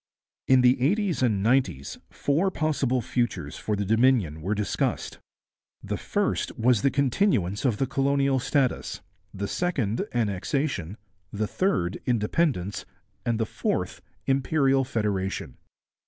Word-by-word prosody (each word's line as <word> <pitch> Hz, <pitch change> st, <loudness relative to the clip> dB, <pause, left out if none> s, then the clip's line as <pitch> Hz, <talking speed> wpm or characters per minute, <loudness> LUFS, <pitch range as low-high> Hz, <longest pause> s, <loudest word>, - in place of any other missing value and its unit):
In 130 Hz, -1 st, +6 dB
the 125 Hz, 0 st, +4 dB
eighties 185 Hz, -, +1 dB
and 105 Hz, -6 st, +2 dB
nineties 115 Hz, -, +1 dB
four 160 Hz, +7 st, +1 dB
possible 140 Hz, -7 st, 0 dB
futures 95 Hz, -, -2 dB
for 105 Hz, -, -2 dB
the 100 Hz, 0 st, -2 dB
Dominion 110 Hz, -, +2 dB
were 100 Hz, +6 st, -1 dB
discussed. 105 Hz, 0 st, -2 dB, 0.6 s
The -, -, -3 dB
first -, -, -1 dB
was 120 Hz, -2 st, +3 dB
the 140 Hz, -, +3 dB
continuance 130 Hz, -, +1 dB
of 120 Hz, -6 st, +2 dB
the 135 Hz, -, +1 dB
colonial 135 Hz, 0 st, +1 dB
status, 135 Hz, 0 st, 0 dB, 0.3 s
the 100 Hz, +1 st, -4 dB
second 125 Hz, -, -1 dB
Annexation, 110 Hz, -, -1 dB, 0.3 s
the 105 Hz, +1 st, -1 dB
third 105 Hz, -, 0 dB
Independence, 115 Hz, -, 0 dB, 0.4 s
and 115 Hz, -1 st, +1 dB
the 110 Hz, -, +1 dB
fourth -, -, -2 dB, 0.2 s
Imperial 135 Hz, 0 st, +2 dB
Federation. 100 Hz, -, -2 dB
125 Hz, 125 wpm, -26 LUFS, 105-140 Hz, 0.6 s, In